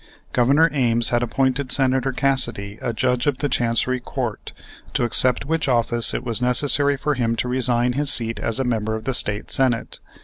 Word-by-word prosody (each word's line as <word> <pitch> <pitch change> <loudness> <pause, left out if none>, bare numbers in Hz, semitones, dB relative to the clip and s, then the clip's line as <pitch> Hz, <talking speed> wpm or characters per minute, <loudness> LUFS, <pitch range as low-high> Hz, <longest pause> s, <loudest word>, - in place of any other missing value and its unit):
Governor 140 +6 +4
Ames 120 -4 +1
had 120 0 +1
appointed 130 +2 -1
Senator 130 -1 +1
Cassidy 125 -7 -2
a 120 - -2
Judge 125 +2 -1
of 140 -3 +1
the 145 - -1
Chancery 125 0 0
Court, - - -5 0.4
to - - +1
accept 125 +1 +3
which 160 +1 -1
office 120 -2 +1
it - - -3
was 120 -1 -2
necessary 140 +3 +2
for 150 +2 -1
him 115 -3 -1
to 125 - -2
resign 125 -1 0
his 145 +1 0
seat 115 -1 +1
as 115 +2 -1
a - - +1
member 110 -3 -1
of 110 - -6
the 135 +3 -2
State 105 -3 0
Senate. 125 -3 0
125 Hz, 190 wpm, -21 LUFS, 115-135 Hz, 0.4 s, Governor